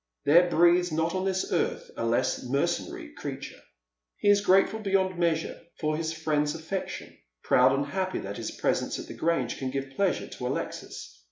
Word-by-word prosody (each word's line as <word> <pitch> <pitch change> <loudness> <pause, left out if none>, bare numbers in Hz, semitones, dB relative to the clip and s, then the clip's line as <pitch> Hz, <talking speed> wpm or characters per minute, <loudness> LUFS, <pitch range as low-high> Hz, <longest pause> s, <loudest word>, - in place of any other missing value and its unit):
There 175 +4 +6
breathes 175 +1 +4
not 160 +2 0
on 185 0 -1
this 190 -1 -1
earth - - -1
a - - -3
less 115 0 +1
mercenary 235 - -2
creature. 140 - -7 0.6
He 205 - +2
is 205 0 +5
grateful 195 +2 +3
beyond 190 -3 0
measure 165 -2 0 0.2
for 155 -1 0
his 160 0 -2
friend's 155 -2 0
afEection, 165 +4 -5 0.3
proud 130 +1 +5
and 135 +1 +1
happy 185 +5 -2
that 100 +1 -5
his - - -4
presence - - -1
at - - -6
the - - -8
Grange 160 -8 -1
can 130 - -2
give 135 0 -4
pleasure 200 -2 0
to - - -5
Alexis. - - -5
165 Hz, 175 wpm, -28 LUFS, 145-190 Hz, 0.6 s, There